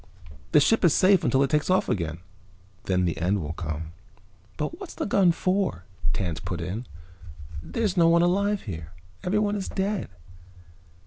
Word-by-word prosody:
The - - +6
ship 210 +11 +3
is 170 -4 +5
safe 190 -1 +5
until 135 0 +3
it 135 - -1
takes 150 +2 +1
off 185 - +3
again, 85 -2 -2 0.6
then 90 -1 +1
the 85 - -1
end 95 +4 +1
will 80 -2 -4
come." 80 -1 -5 0.7
"But 150 - -3
what's 390 -4 -8
this - - -3
gun 195 -3 +4
for?" 185 - -1 0.3
Tance 85 -1 -2
put 90 -1 -5
in. 95 +8 -4 0.7
"There's 205 - -2
no 165 -1 +6
one 170 0 +5
alive 200 +3 +1
here. 85 -4 -7 0.3
Everyone 205 +2 +1
is 195 -2 -3
dead." 195 - -2
150 Hz, 165 wpm, -26 LUFS, -, 0.7 s, The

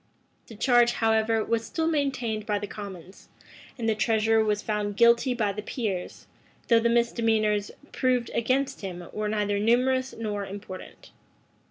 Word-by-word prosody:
[] - - -41
The 225 - -11
charge, 240 +1 +4
however, 225 -1 +1
was 230 -1 0
still 320 +7 -2
maintained 255 -9 -1
by 210 -1 +1
the 205 - -4
commons; 195 -3 -10 0.5
and 230 -2 -3
the 220 - +3
treasurer 220 +1 +2
was 210 -1 0
found 205 -1 -2
guilty 235 +2 +4
by 215 -4 0
the 210 - -5
peers, 205 -5 -4 0.4
though 230 -1 +6
the 235 +1 +1
misdemeanors 225 -3 +1 0.2
proved 250 -3 0
against 265 +4 0
him 180 -3 -6
were 215 0 -2
neither 205 -1 0
numerous 255 +4 +2
nor 210 -3 -3
important. 195 -1 -9
220 Hz, 155 wpm, -26 LUFS, 205-235 Hz, 0.5 s, though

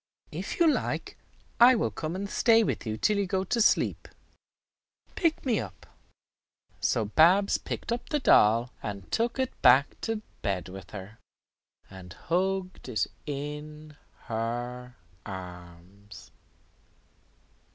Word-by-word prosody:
If - - -5
you 340 - +5
like, 310 - -1 0.4
I 250 +2 +8
will 225 - 0
come 160 +2 -4
and 200 +2 -3
stay 225 +2 +4
with 160 - -2
you 110 0 -2
till 210 - +2
you 200 - 0
go 190 0 0
to 230 +5 0
sleep. - - +2 1.1
Pick 330 -4 0
me 235 -6 +2
up." 95 -6 -8 0.9
So 110 - +1
Babs 175 - +4
picked - - -5
up 235 - -3
the 300 - +1
doll, 115 - +4
and 100 -3 -7
took 235 +2 0
it 260 -1 0
back 130 +3 +5
to 225 -1 -3 0.2
bed 95 -2 -2
with 95 0 -10
her, 105 +2 -9 0.7
and 95 -2 -11
hugged 185 - -2
it 115 - 0 0.2
in 150 +1 -6 0.3
her 120 +2 -4 0.3
arms. 90 +1 -11
140 Hz, 130 wpm, -28 LUFS, -, 1.1 s, I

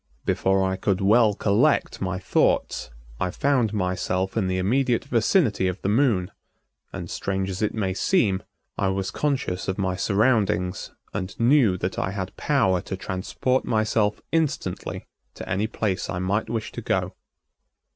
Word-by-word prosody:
Before 95 0 +2
I 95 0 -1
could 95 -1 0
well 105 +1 +4
collect 110 +10 +2
my 95 -1 -1
thoughts 95 - +1 0.3
I 90 - 0
found 125 0 +1
myself 95 -1 -1
in 105 -5 +1
the 95 0 0
immediate 120 +6 +1
vicinity 115 - +2
of 90 +1 -3
the 95 - +1
Moon 105 -6 +2 0.6
and, - - -6
strange 95 0 -2
as 95 - -5
it 105 - 0
may 95 -4 -1
seem, 100 - +2 0.4
I 100 - +2
was 95 0 -1
conscious 135 -11 -1
of 95 - -1
my 95 -2 0
surroundings 100 -3 +1 0.2
and 95 -1 -5
knew 115 -5 +4
that 90 +1 -3
I - - -1
had 95 -2 -5
power 105 -12 +2
to 95 - -5
transport 105 +8 -1
myself 110 -1 +1
instantly 150 - -2 0.3
to - - -8
any 100 +4 0
place 105 -4 -2
I 90 - -2
might 95 +5 -1
wish 115 -1 -3
to - - -6
go. - - -1
100 Hz, 155 wpm, -24 LUFS, 95-115 Hz, 0.6 s, well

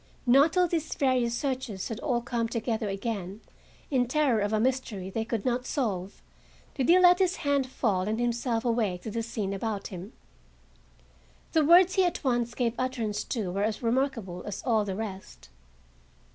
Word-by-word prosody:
Not 275 +6 +5
till 360 -1 +3
these 325 -2 -2
various 255 -4 +1
searchers 255 -8 -3
had 225 0 -4
all 245 -4 0
come 235 -1 -2
together 225 -2 -2
again, 200 -1 -4 0.5
in 250 -3 +2
terror 265 -4 +2
of 205 +1 0
a 215 - +1
mystery 225 -6 -1
they 225 +3 -1
could 225 -2 -3
not 250 0 0
solve, 200 - -3 0.5
did 265 0 -1
he 350 - +8
let 360 0 +6
his 375 0 +2
hand 280 -2 +2
fall 205 -7 0
and 220 +2 -1
himself 235 0 -1
awake 220 -7 0
to 220 - -5
the 230 - -2
scene 215 -4 -3
about 200 0 -3
him. 185 +2 -8 1.4
The 315 - +3
words 350 +4 +6
he 380 - +3
at 355 - -1
once 240 -3 0
gave 235 -3 0
utterance 245 -5 -2
to 210 -7 -3
were 200 +2 -1
as 215 +2 -2
remarkable 230 -7 -1
as 205 - -5
all 220 -4 +2
the 195 -2 -3
rest. 190 - -7
235 Hz, 175 wpm, -28 LUFS, 210-260 Hz, 1.4 s, he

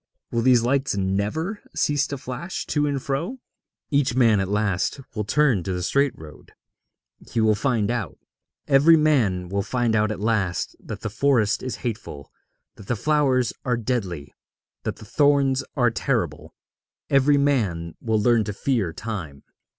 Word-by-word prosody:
Will 115 - 0
these 125 -1 +4
lights 135 -2 0
never 105 - -1
cease 145 -1 +1
to 140 - -4
flash 130 +8 -5
to 150 -1 0
and 140 -1 -1
fro?' 145 - -3 0.5
Each 140 -4 +2
man 115 -5 +4
at 95 -1 -1
last 105 +3 0
will 105 -1 -3
turn 130 -3 +2
to 95 +2 -3
the 90 0 -3
straight 140 +7 +1
road. 75 -1 -13 0.8
He 115 - 0
will 110 -1 +4
find 110 -1 0
out. 115 - -3 0.5
Every 150 +4 +6
man 115 - +2
will 100 +3 -1
find 115 +2 0
out 105 0 +2
at 110 - -5
last 105 -5 -1
that 105 - -8
the 110 - -4
forest 115 -3 +2
is 130 - -4
hateful, 105 - -5 0.5
that 100 - -13
the 120 - 0
flowers 135 -2 +1
are 125 -2 0
deadly, 100 - -3 0.5
that - - -2
the - - -13
thorns 140 +1 +2
are 120 -5 +3
terrible; - - -2 0.6
every 140 +1 +4
man 105 - 0
will 110 -2 +1
learn 115 +1 +3
to 105 - -4
fear 105 -6 -1
Time. 85 -9 -6
115 Hz, 160 wpm, -23 LUFS, 100-140 Hz, 0.8 s, Every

